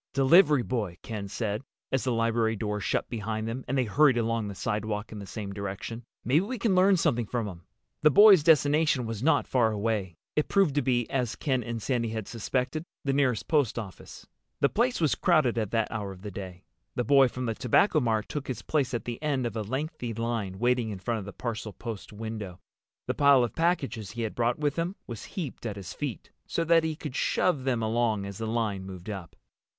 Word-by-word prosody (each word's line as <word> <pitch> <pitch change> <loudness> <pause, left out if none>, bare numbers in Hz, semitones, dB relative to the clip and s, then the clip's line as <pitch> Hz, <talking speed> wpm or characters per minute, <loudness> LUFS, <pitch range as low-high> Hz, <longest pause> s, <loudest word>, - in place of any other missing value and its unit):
"Delivery 145 0 +5
boy," 105 -10 -3
Ken 105 -3 -5
said, 105 +1 -2 0.3
as 130 - +1
the 130 - 0
library 115 -1 +1
door 105 0 -2
shut - - -1
behind 110 -1 -3
them 125 +3 -4
and 135 - 0
they 130 - +3
hurried 130 +4 +4
along 115 -2 0
the 100 - -6
sidewalk 105 0 -3
in 110 - -7
the 100 - -8
same 100 0 -6
direction. 100 +4 -5 0.2
"Maybe 140 +7 +4
we 250 +5 -4
can 215 -2 +1
learn 185 +1 +5
something 120 -10 +1
from 115 -2 -2
him." 90 -4 -8 0.4
The 155 - +6
boy's 200 +1 +8
destination 150 -3 +3
was 115 -2 -4
not 160 +5 +3
far 120 -4 +2
away. 105 -4 -2 0.2
It 150 - +1
proved 195 -7 +3
to 145 - +2
be—as 125 -2 0
Ken 130 -4 0
and 115 -1 -4
Sandy 115 0 -1
had 110 -2 -4
suspected—the 135 - -3
nearest 130 -5 +1
post 145 -9 +2
office. 100 -5 -8 0.3
The 140 - +4
place 245 +3 +1
was 155 -4 +3
crowded 155 -10 +2
at 110 -3 -1
that 115 0 0
hour 105 -3 -3
of 95 0 -12
the 105 - -5
day. 90 -2 -8 0.3
The 125 - 0
boy 135 +3 +6
from 125 +1 -5
the 115 - 0
Tobacco 135 - +3
Mart 110 -5 0
took 145 -2 -5
his 130 - -4
place 140 -5 0
at 120 - -4
the 120 +1 -5
end 140 -5 0
of 115 -2 -3
a 110 - -1
lengthy 130 - -4
line 115 -5 -2
waiting 120 0 +1
in 100 - -4
front 115 +4 -2
of 100 - -7
the 100 - -7
parcel 110 -3 -4
post 115 -2 -7
window. 105 -4 -6 0.5
The - - -1
pile 140 -3 +5
of 120 - -2
packages 135 - -1
he 120 -1 -3
had 110 - -3
brought 120 0 +1
with 145 0 -1
him 170 +3 -1
was 115 -3 -7
heaped 160 -9 -4
at 105 - -4
his 95 -4 -7
feet, 140 - -5 0.2
so 165 - 0
that 165 0 +4
he 160 -1 -1
could 150 -4 -7
shove 150 -5 +1
them 120 -4 +1
along 110 -2 +1
as 100 0 -7
the 110 - -3
line 110 -4 -1
moved 95 0 -9
up. 95 -6 -6
120 Hz, 215 wpm, -28 LUFS, 110-140 Hz, 0.5 s, boy's